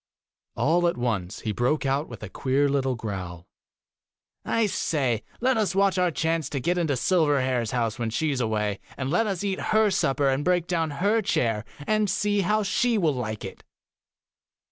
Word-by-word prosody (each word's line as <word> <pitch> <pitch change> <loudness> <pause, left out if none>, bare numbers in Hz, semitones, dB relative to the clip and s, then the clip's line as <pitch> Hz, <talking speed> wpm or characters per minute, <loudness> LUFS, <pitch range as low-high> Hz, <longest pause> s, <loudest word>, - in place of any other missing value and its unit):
All 165 +9 +2
at 170 - -1
once, 110 -6 -2
he 110 - -2
broke 125 +8 0
out 135 +3 0
with 115 -3 -9
a - - -4
queer 135 +8 +1
little 135 -2 0
growl, 90 -6 -6 0.5
' - - -63
I 230 - +4
say, 135 - 0 0.2
let 255 0 +2
us 205 -4 0
watch 195 -1 +3
our 180 -1 +3
chance 160 -2 -1
to 140 - -2
get 175 +7 0
into 155 -5 +1
Silverhair's 130 - +1
house 120 -1 -1
when 115 -1 -1
she 150 +7 0
is 130 -2 -1
away, 105 -3 -1 0.2
and 135 0 -3
let 215 +6 +2
us 195 -2 -2
eat 195 -2 -1
her 215 -1 +3
supper 140 -6 +1
and 135 +2 +1
break 180 0 +2
down 165 -3 0 0.2
her 220 +2 +3
chair, 115 - 0 0.2
and 215 +1 +1
see 205 +1 +1
how 210 +3 +1
she 235 +3 +1
will 165 -7 +2
like 110 -4 -4
it. - - -9
145 Hz, 190 wpm, -25 LUFS, 120-185 Hz, 0.5 s, I